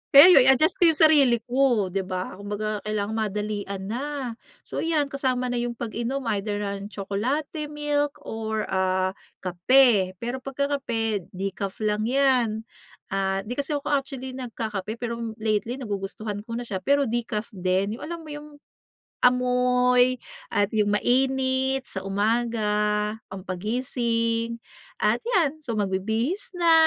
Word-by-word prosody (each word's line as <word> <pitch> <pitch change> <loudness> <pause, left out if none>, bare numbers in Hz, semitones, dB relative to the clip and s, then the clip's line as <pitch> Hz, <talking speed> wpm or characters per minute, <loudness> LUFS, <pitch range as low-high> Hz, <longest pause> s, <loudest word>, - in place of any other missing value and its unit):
Kaya 305 +7 +11
'yon 265 -7 +7
i-adjust 270 +7 +4
ko 350 - +6
yung 320 - +4
sarili 280 -6 +6
ko, 245 -6 +2
di 195 - -1
ba? 185 0 -4
Kumbaga 210 +1 -3
kailangang 215 +1 -1
madalian 205 -2 -3
na 260 +4 -3 0.3
so - - -5
'yan 305 -4 0
kasama 255 -2 0
na 245 - 0
yung 240 0 -2
pag-inom 240 +4 -3 0.2
either, 205 0 -3
ah, 200 0 -3
tsokolate, 250 - -3
milk 295 -1 -1
or, 220 -1 -3
ah, 185 0 +1 0.3
kape 190 +1 +4
pero 245 +2 -2
pagka 275 +2 -2
kape 225 -7 -2
decaf 195 0 -3
lang 210 +1 +1
'yan. 250 -4 +2 0.5
Ah, 195 0 0
di 245 +7 -5
kasi 290 +2 -1
ako 290 +1 -3
actually 270 -2 -2
nagkakape 220 -5 -4
pero 235 -1 -4 0.2
lately 215 +2 -1
nagugustuhan 205 -3 -4
ko 230 - -4
na 245 - -3
siya 200 -5 -3
pero 280 +9 +2
decaf 230 -3 -2
din, 190 +3 -1
yung - - -8
alam 335 0 -6
mo 310 - -9
yung 295 0 -9 0.7
amoy 250 0 +3 0.3
at 205 - 0
yung 210 -2 +2
mainit 265 +2 +1
sa 190 - -4
umaga 210 0 +1 0.2
pangpagising 230 +4 -1 0.4
at - - +2
'yan 345 - +1
so 240 -7 -4
magbibihis 220 - -1
na, 340 -1 +4
235 Hz, 140 wpm, -25 LUFS, 205-265 Hz, 0.7 s, Kaya